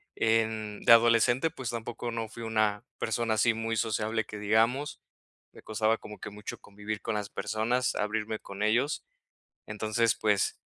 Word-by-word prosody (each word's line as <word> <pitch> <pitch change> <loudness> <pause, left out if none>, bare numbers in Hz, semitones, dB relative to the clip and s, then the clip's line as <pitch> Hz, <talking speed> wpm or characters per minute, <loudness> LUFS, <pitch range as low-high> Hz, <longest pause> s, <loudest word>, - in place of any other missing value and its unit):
en 110 -2 0
de - - +5
adolescente, 120 +5 +5
pues, 130 -4 -5
tampoco 120 +1 -4
no 115 -1 -3
fui 115 +2 -10
una 110 -2 0
persona 115 -1 0
así 115 +1 +3
muy 115 0 -2
sociable 110 0 0
que 105 0 -8
digamos, 115 +7 +1 0.5
me - - -13
costaba 110 +1 +1
como 105 -1 -10
que - - -7
mucho 105 +1 -7
convivir 105 +1 -6
con 115 - -2
las 105 -1 -3
personas, 120 +4 0
abrirme 105 +1 -2
con 100 +1 -6
ellos, 125 +8 +1 0.6
entonces, 110 +2 +1
pues, 105 -3 +1
110 Hz, 155 wpm, -29 LUFS, 105-115 Hz, 0.6 s, de